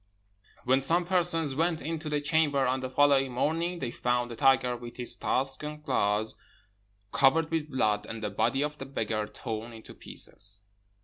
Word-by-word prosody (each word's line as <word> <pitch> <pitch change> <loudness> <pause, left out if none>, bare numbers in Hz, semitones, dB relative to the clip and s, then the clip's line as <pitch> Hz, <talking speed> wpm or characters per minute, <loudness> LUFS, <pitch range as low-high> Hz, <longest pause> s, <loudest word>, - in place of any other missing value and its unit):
"When 130 +2 +3
some 170 +6 +2
persons 170 -5 +1
went 165 +3 +1
into 160 0 -4
the 150 -1 0
chamber 145 -2 +2
on 130 +1 +1
the 130 0 -4
following 135 -1 +3
morning, 165 +7 0
they 130 -7 -3
found 120 0 -1
a - - -5
tiger 130 0 +3
with 120 0 -9
his 125 -1 -2
tusks 135 +2 0
and 150 0 -7
claws 105 -3 +1 0.8
covered 135 +7 +3
with 160 -2 -1
blood, 105 -6 0
and 115 -1 -6
the 105 - -2
body 135 +7 +1
of 150 0 -4
the 135 - -6
beggar 110 -5 -2
torn 115 +1 -5
into 110 -1 -11
pieces. 100 0 -8
135 Hz, 175 wpm, -29 LUFS, 120-150 Hz, 0.8 s, When